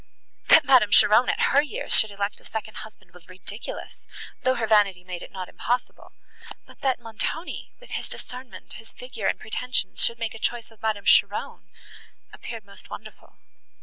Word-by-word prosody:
—That -, -, +7 dB
Madame 255 Hz, -6 st, +6 dB
Cheron 215 Hz, +4 st, +6 dB
at -, -, +2 dB
her 280 Hz, -, +7 dB
years 415 Hz, -, -1 dB
should 220 Hz, -, +5 dB
elect 200 Hz, 0 st, -4 dB
a -, -, -22 dB
second 215 Hz, -1 st, -6 dB
husband 215 Hz, -5 st, -11 dB
was 180 Hz, -1 st, -15 dB
ridiculous, 185 Hz, +4 st, -8 dB, 0.4 s
though 255 Hz, 0 st, +2 dB
her 235 Hz, -, 0 dB
vanity 205 Hz, -4 st, +3 dB
made 180 Hz, -1 st, -7 dB
it -, -, -10 dB
not 185 Hz, -2 st, -6 dB
impossible; 245 Hz, +1 st, -3 dB, 0.5 s
but -, -, -18 dB
that 265 Hz, -2 st, +1 dB
Montoni, 235 Hz, +9 st, -5 dB
with -, -, -16 dB
his -, -, -4 dB
discernment, 250 Hz, -1 st, -8 dB
his 225 Hz, +1 st, -12 dB
figure, 250 Hz, -5 st, -5 dB
and -, -, 0 dB
pretensions, 250 Hz, +3 st, -1 dB
should 235 Hz, -, +2 dB
make 230 Hz, -1 st, -3 dB
a 225 Hz, -, -9 dB
choice 235 Hz, 0 st, -1 dB
of 225 Hz, -, -21 dB
Madame 215 Hz, -2 st, -1 dB
Cheron—appeared 225 Hz, -3 st, -1 dB
most 200 Hz, -1 st, -15 dB
wonderful. -, -, -11 dB
225 Hz, 170 wpm, -25 LUFS, 205-250 Hz, 0.5 s, That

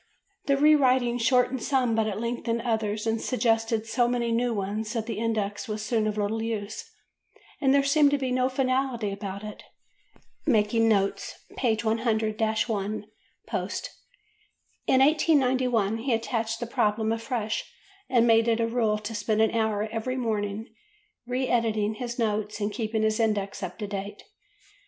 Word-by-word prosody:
The 275 Hz, -1 st, +3 dB
re 300 Hz, +2 st, +6 dB
writing 255 Hz, -4 st, +3 dB
shortened 250 Hz, +2 st, +2 dB
some 255 Hz, -4 st, +1 dB
but 220 Hz, -1 st, +1 dB
it 205 Hz, -, -3 dB
lengthened 235 Hz, 0 st, -2 dB
others 220 Hz, -2 st, -1 dB
and 225 Hz, 0 st, 0 dB
suggested 225 Hz, -3 st, +1 dB
so 240 Hz, +2 st, +1 dB
many 240 Hz, -1 st, 0 dB
new 240 Hz, +1 st, +1 dB
ones 210 Hz, +1 st, -3 dB
that 225 Hz, -2 st, -2 dB
the 225 Hz, -2 st, -4 dB
index 215 Hz, -3 st, -2 dB
was 215 Hz, 0 st, -4 dB
soon 220 Hz, -2 st, +1 dB
of 215 Hz, 0 st, -2 dB
little 210 Hz, +2 st, -1 dB
use 220 Hz, -2 st, -4 dB, 0.7 s
and 270 Hz, -3 st, +4 dB
there 280 Hz, 0 st, +4 dB
seemed 285 Hz, +1 st, +4 dB
to 285 Hz, -, +1 dB
be 260 Hz, -2 st, -2 dB
no 255 Hz, 0 st, +2 dB
finality 255 Hz, -4 st, 0 dB
about 200 Hz, 0 st, -6 dB
it 210 Hz, -1 st, -8 dB, 0.9 s
("Making 225 Hz, -2 st, +3 dB
Notes," 200 Hz, -2 st, 0 dB, 0.2 s
pp. 225 Hz, -4 st, +1 dB
100–1 220 Hz, -2 st, 0 dB, 0.4 s
post). -, -, -4 dB, 1.0 s
In 260 Hz, -, +4 dB
1891 255 Hz, -7 st, +3 dB
he 245 Hz, +2 st, -1 dB
attached 225 Hz, 0 st, -2 dB
the 240 Hz, -, -3 dB
problem 220 Hz, -1 st, 0 dB
afresh 225 Hz, -1 st, -3 dB, 0.4 s
and 240 Hz, -2 st, +4 dB
made 225 Hz, 0 st, +4 dB
it 230 Hz, 0 st, +2 dB
a 230 Hz, -, +2 dB
rule 230 Hz, -2 st, +1 dB
to 210 Hz, +1 st, -6 dB
spend 210 Hz, 0 st, -1 dB
an 220 Hz, -, +2 dB
hour 220 Hz, -2 st, 0 dB
every 235 Hz, +3 st, -3 dB
morning 215 Hz, -3 st, -2 dB, 0.6 s
re 255 Hz, +1 st, -1 dB
editing 220 Hz, -3 st, +1 dB
his 240 Hz, +1 st, -5 dB
notes 215 Hz, -2 st, -1 dB
and 205 Hz, 0 st, -1 dB
keeping 220 Hz, 0 st, -1 dB
his 215 Hz, 0 st, +1 dB
index 210 Hz, -3 st, 0 dB
up 185 Hz, -2 st, -5 dB
to 210 Hz, -, -4 dB
date. 200 Hz, 0 st, -6 dB
225 Hz, 160 wpm, -27 LUFS, 215-245 Hz, 1.0 s, re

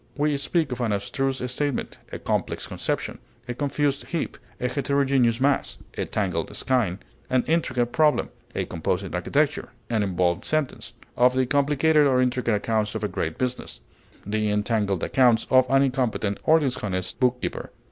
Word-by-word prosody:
We 150 Hz, 0 st, +2 dB
speak 145 Hz, +1 st, 0 dB
of 125 Hz, 0 st, -3 dB
an 115 Hz, -3 st, 0 dB
abstruse 130 Hz, +6 st, -2 dB
statement, 145 Hz, +1 st, -2 dB
a -, -, -4 dB
complex -, -, -2 dB
conception, -, -, -3 dB, 0.3 s
a 125 Hz, -, -2 dB
confused 145 Hz, +1 st, -1 dB
heap, 170 Hz, -2 st, -3 dB, 0.2 s
a 125 Hz, -, 0 dB
heterogeneous 135 Hz, -3 st, +2 dB
mass, 140 Hz, +1 st, +1 dB, 0.2 s
a -, -, -2 dB
tangled 90 Hz, -6 st, -2 dB
skein, 120 Hz, -9 st, +1 dB, 0.3 s
an 130 Hz, -1 st, +2 dB
intricate 130 Hz, -7 st, 0 dB
problem; 155 Hz, -2 st, +3 dB, 0.3 s
of -, -, -1 dB
composite 80 Hz, -, -2 dB
architecture, -, -, 0 dB, 0.2 s
an 110 Hz, -2 st, +2 dB
involved 90 Hz, -3 st, 0 dB
sentence; 150 Hz, -6 st, -2 dB, 0.2 s
of 125 Hz, +1 st, +4 dB
the 130 Hz, 0 st, +3 dB
complicated 145 Hz, +2 st, +3 dB
or 130 Hz, -2 st, +3 dB
intricate 125 Hz, -3 st, +1 dB
accounts 110 Hz, +1 st, -1 dB
of 110 Hz, -, -3 dB
a -, -, +2 dB
great 80 Hz, -5 st, -3 dB
business, 125 Hz, -, -3 dB, 0.5 s
the 105 Hz, +1 st, 0 dB
entangled 105 Hz, -3 st, 0 dB
accounts 125 Hz, -4 st, +3 dB
of 130 Hz, -1 st, +6 dB
an 135 Hz, 0 st, +5 dB
incompetent 125 Hz, -6 st, 0 dB
or 160 Hz, +1 st, +6 dB
dishonest 105 Hz, -, -2 dB
bookkeeper. 125 Hz, -1 st, -1 dB
125 Hz, 155 wpm, -25 LUFS, 110-140 Hz, 0.5 s, of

